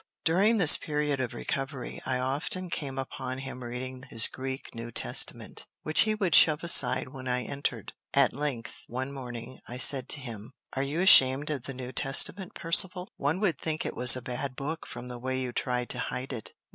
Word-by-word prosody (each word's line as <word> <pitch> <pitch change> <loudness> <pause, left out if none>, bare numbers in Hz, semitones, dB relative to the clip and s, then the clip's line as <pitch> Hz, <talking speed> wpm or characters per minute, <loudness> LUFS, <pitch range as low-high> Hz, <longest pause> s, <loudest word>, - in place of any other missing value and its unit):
During 200 +8 +3
this 180 -7 +7
period 150 -2 -2
of 130 -2 -3
recovery, 135 -2 -5
I 130 - 0
often 145 +8 -2
came 135 -5 -4
upon 130 -1 -5
him 130 -1 -7
reading 125 +2 -6
his 115 -1 +4
Greek 130 0 -7
New 115 0 -7
Testament, - - 0 0.2
which 155 0 +3
he 215 - +1
would 190 -6 -1
shove 155 +1 +6
aside 170 -5 +4
when 130 0 -9
I 125 0 -1
entered. 140 +5 -4 0.2
At 140 -2 +3
length, 140 -5 -4
one 130 +3 -4
morning, 125 -2 -8
I 125 - -7
said 130 0 +4
to 150 - -3
him, 115 -2 -9 0.2
"Are 135 - -2
you 145 +5 -2
ashamed 140 -5 +6
of 135 -5 -4
the 135 - -6
New 125 0 -7
Testament, 160 +9 +1
Percivale? 180 +2 +3
One 150 +6 -1
would 175 -9 0
think 155 -1 -3
it - - -4
was 125 0 +7
a 130 - -6
bad 130 +1 -4
book 155 +5 -5
from 125 - -8
the 125 -1 -7
way 130 +1 -2
you 130 -1 -3
try 125 0 -2
to - - -1
hide 130 +2 -4
it." 115 -3 -7
135 Hz, 195 wpm, -28 LUFS, 125-150 Hz, 0.2 s, this